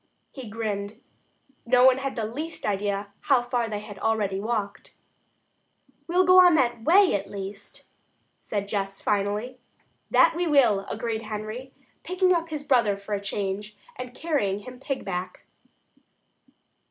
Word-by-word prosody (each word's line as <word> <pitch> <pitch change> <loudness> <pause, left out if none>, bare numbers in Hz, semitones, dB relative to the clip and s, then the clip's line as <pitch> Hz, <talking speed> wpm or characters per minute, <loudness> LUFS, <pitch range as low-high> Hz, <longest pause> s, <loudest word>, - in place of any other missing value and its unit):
He 260 -5 -9
grinned. 210 -1 -4 0.6
No 250 +1 +4
one 260 0 +6
had 275 0 -3
the 225 -3 -2
least 300 +9 -6
idea 200 0 -1
how 260 -3 +2
far 240 -2 -1
they 210 -1 -4
had 205 -2 -10
already 210 -3 0
walked. 210 -1 -4 1.1
"We'll 360 +2 +3
go 365 0 +7
that 260 -10 +4
way 370 - +5
at 195 -1 -2
least," 200 0 -8 0.6
said 200 -1 -3
Jess 195 -1 -3
finally. 210 +5 -1 0.5
"That 330 - +5
we 350 0 0
will," 235 -10 +3
agreed 220 0 -3
Henry, 215 +4 -6 0.3
picking 365 +1 +2
up 335 -1 -1
his 305 -2 -4
brother 235 -8 +2
for 200 +1 -7
a 200 - -1
change, 200 +1 -4 0.2
and 250 0 -8
carrying 205 - -1
him 250 +3 -11
"pig 270 0 -4
back." 180 -1 -5
225 Hz, 140 wpm, -26 LUFS, 200-265 Hz, 1.1 s, go